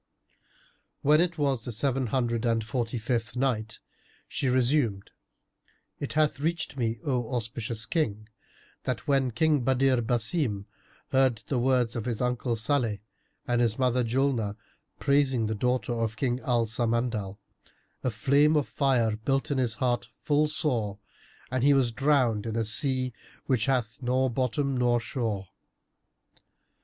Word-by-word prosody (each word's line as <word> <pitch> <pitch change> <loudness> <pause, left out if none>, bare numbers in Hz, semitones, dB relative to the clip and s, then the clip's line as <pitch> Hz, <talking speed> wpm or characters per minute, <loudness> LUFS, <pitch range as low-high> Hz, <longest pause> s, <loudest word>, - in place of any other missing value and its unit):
When 150 +3 +5
it 175 -1 0
was 140 -4 +1
the 120 - -3
Seven 130 +3 0
Hundred 120 -1 0
and 115 -2 +1
Forty 120 +1 -2
fifth 115 -1 -2
Night, 120 -4 -1 0.5
She 135 - -2
resumed, 125 -5 +1 0.9
It 145 - -4
hath 150 -2 +2
reached 160 -1 -2
me, 115 -3 -1
O 125 -3 -1
auspicious 115 -1 -3
King, 110 - -1 0.5
that 125 -2 -3
when 135 -2 +2
King 155 +4 +2
Badr 130 -1 +3
Basim 115 - 0 0.5
heard 130 -5 +2
the 130 - +1
words 125 -2 +2
of 115 -2 -3
his 120 -3 -2
uncle 125 -1 0
Salih 115 -1 0 0.5
and 120 0 +2
his 115 -2 +1
mother 125 -1 +2
Julnar, 120 -3 0 0.4
praising 140 -4 +2
the 110 - -1
daughter 125 +1 0
of 115 -1 -2
King 125 -2 0
Al 120 -3 +1
Samandal, 115 -3 -1 0.7
a 130 - +1
flame 140 +7 +3
of 150 -2 +1
fire 125 -6 +1
burnt 135 +7 0
in 140 - +1
his 120 -3 +1
heart 125 -2 0
full 150 +1 +2
sore 120 -9 0 0.5
and 130 -1 0
he 140 0 +5
was 130 -3 +2
drowned 120 -4 +2
in 110 - -3
a 115 -1 0
sea 130 +1 +1 0.3
which 125 -4 +1
hath 125 -3 0
nor 130 +1 +1
bottom 130 +3 0
nor 120 -1 +2
shore. 115 -6 -3
125 Hz, 145 wpm, -27 LUFS, 115-135 Hz, 0.9 s, When